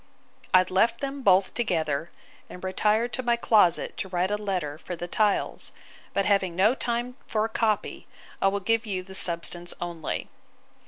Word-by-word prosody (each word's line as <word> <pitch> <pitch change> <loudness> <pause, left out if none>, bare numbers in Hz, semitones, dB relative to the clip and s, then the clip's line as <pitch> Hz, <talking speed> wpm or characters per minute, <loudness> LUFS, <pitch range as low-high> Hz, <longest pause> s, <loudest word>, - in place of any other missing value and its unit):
I 185 0 +7
left 225 +6 +2
them 275 0 -4
both 190 -4 +4
together, 165 -9 -1 0.4
and 180 - -10
retired 215 +5 +1
to 255 - -1
my 240 -1 +2
closet 210 -7 +3
to 190 - -4
write 180 +2 0
a - - +2
letter 180 -8 -3
for 180 - -6
the 175 +1 -6
tiles; 210 +2 0 0.4
but 195 - 0
having 195 -4 +2
no 200 +6 +4
time 245 0 -3
for 215 0 0
a - - -3
copy, 220 -2 -1 0.3
I - - +4
will 200 +1 0
give 225 +3 +1
you 185 -3 -2
the 190 +1 -12
substance 175 -1 0
only. 170 -2 -4
195 Hz, 170 wpm, -26 LUFS, 180-225 Hz, 0.4 s, I